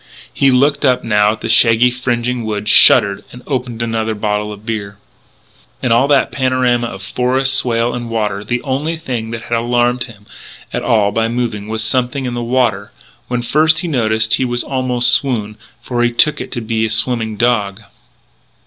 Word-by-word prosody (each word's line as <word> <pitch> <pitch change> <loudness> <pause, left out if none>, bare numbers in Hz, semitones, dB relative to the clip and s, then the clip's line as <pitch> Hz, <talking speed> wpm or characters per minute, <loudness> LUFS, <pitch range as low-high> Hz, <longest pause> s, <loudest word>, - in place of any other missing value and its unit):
He 135 - +3
looked 140 +4 +2
up 130 -3 +2
now 105 -2 +2
at 110 - -11
the - - -4
shaggy 115 +1 +4
fringing 125 -1 -2
woods, 105 -1 -1
shuddered, 100 -1 +6 0.2
opened 125 -4 -3
another 110 -1 -2
bottle 105 0 -2
of 105 +1 -11
beer. 105 -3 -5 0.9
In 125 - 0
all 120 +4 +4
that 140 -2 +2
panorama 130 -2 0
of 95 -3 -9
forest, 130 +5 0
swale, 120 -2 +1
and 120 -1 -5
water 105 -3 -2
the 120 +3 -3
only 145 +4 -2
thing 125 -8 -5
that 115 0 -6
had 120 0 -2
alarmed 120 +1 0
him 105 -4 -16 0.5
at - - -2
all 105 -3 +2
by 115 +2 0
moving 115 -3 -3
was 110 0 -3
something 125 +3 -1
in 125 - -3
the 120 - -3
water. 115 -5 -1 0.4
When 120 -1 -2
first 155 +5 +2
he 175 - -4
noticed 110 -6 0
it - - +4
he 120 -1 -1
almost 130 -2 +1
swooned, 110 -6 0 0.3
for 120 -1 -2
he 120 0 +2
took 150 +5 +2
it - - -8
to 120 - -4
be 110 0 -2
a 110 - 0
swimming 110 -1 0
dog. 110 -4 0
120 Hz, 185 wpm, -16 LUFS, 110-125 Hz, 0.9 s, shuddered